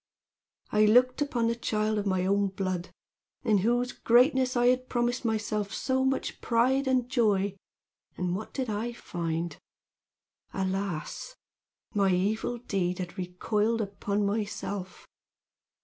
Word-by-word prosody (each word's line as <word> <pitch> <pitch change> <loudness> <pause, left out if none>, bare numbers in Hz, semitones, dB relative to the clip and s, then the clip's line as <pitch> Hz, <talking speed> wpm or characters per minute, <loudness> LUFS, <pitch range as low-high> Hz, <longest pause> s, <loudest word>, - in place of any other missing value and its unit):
I 215 0 +5
looked 250 +5 +4
upon 245 -5 0
the 230 - +2
child 215 -2 0
of 205 - -2
my 185 -1 +1
own 200 +1 +2
blood, 185 -2 -3 0.5
in 215 -5 +3
whose 240 +4 +1
greatness 255 +1 +3
I 240 - +3
had 255 +1 +2
promised 240 +1 0
myself 215 -3 -1
so 260 0 0
much 265 0 -1
pride 255 +4 +2
and 255 -2 +2
joy, 205 -6 +2 0.6
and 180 0 -1
what 215 - -6
did 260 -2 -2
I 220 +3 -2
find? 170 -6 -3 1.0
Alas! 190 - -3 0.6
my 200 -3 +3
evil 210 +6 0
deed 190 -6 -1
had 180 -2 -5
recoiled 210 +5 0
upon 200 0 -1
myself. 205 -2 -3
215 Hz, 130 wpm, -28 LUFS, 195-240 Hz, 1.0 s, I